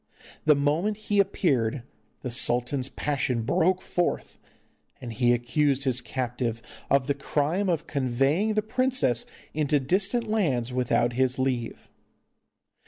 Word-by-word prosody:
The 150 -1 +6
moment 155 +9 0
he 210 -1 -1
appeared 140 - +1 0.4
the 125 - -4
sultan's 125 +2 0
passion 130 -5 -1
broke 180 +9 +1
forth, 175 -1 -2 0.6
and 120 -2 -7
he 120 +2 +2
accused 135 +3 +1
his 130 -2 +1
captive 120 -2 -3 0.3
of 140 -1 +3
the 140 - +1
crime 160 +9 -1
of 165 -2 0
conveying 140 - 0
the 215 - +1
princess 220 - 0 0.3
into 150 -1 +1
distant 190 - +1
lands 135 - 0
without 120 -1 +1
his 130 +1 +1
leave. 130 -3 -2
140 Hz, 125 wpm, -26 LUFS, 125-175 Hz, 0.6 s, The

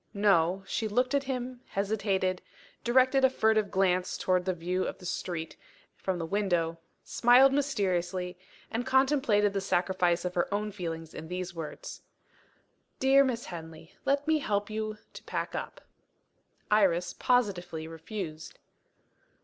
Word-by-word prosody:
No: 195 -2 +3
she 220 +3 -2
looked 250 +5 +1
at 280 -1 +1
him 250 -1 -4
hesitated 195 -2 -1 0.4
directed 260 +2 +4
a 265 - +7
furtive 220 -4 +2
glance 185 -1 +1
towards 185 0 +1
the 185 - +2
view 180 +2 -1
of - - -4
the 180 - -13
street 170 -2 -4 0.4
from 190 -2 -2
the 165 - -3
window 175 -4 0 0.2
smiled 250 +3 +5
mysteriously 185 -10 -1 0.4
and 230 +2 -1
completed 265 -6 +3
the 195 - -1
sacrifice 180 -1 +1
of 180 - -2
her 175 +1 0
own 210 +1 -1
feelings 165 -4 -6
in 160 - -8
these 180 +1 -4
words: 165 -3 -7 1.0
"Dear 270 +1 +6
Miss 245 -3 -2
Henley, 165 -1 -9
let 280 +1 +1
me 315 -1 +3
help 205 -5 -1
you 215 0 -3 0.2
to - - -9
pack - - -3
up." - - -5 0.9
Iris 185 -4 +3
positively 180 -10 0
refused. 165 0 -7
195 Hz, 140 wpm, -29 LUFS, 175-240 Hz, 1.0 s, a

